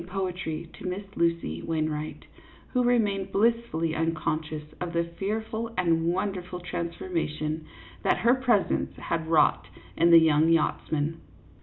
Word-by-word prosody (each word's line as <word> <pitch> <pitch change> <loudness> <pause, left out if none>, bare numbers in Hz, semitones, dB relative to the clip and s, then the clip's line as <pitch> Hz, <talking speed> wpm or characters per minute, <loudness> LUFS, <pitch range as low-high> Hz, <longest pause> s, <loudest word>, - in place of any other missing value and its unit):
49 190 +2 -5
poetry 170 -3 -3
to - - -9
Miss 185 +3 -3
Lucy 170 - 0
Wainwright, 155 -1 -3 0.5
who 250 -1 +3
remained 205 -5 +1
blissfully 220 -7 +1
unconscious 155 -1 -1 0.2
of 175 -1 -3
the 170 0 +2 0.2
fearful 220 +3 -2
and 165 -2 +2
wonderful 180 -1 -3
transformation 165 -3 -3 0.4
that - - +3
her 240 - +7
presence 250 -6 +1
had 165 -1 -2
wrought 160 -2 +3 0.3
in 170 +1 +4
the 170 - +9
young 160 -1 +5
yachtsman. 160 -1 0
170 Hz, 130 wpm, -27 LUFS, 160-195 Hz, 0.5 s, the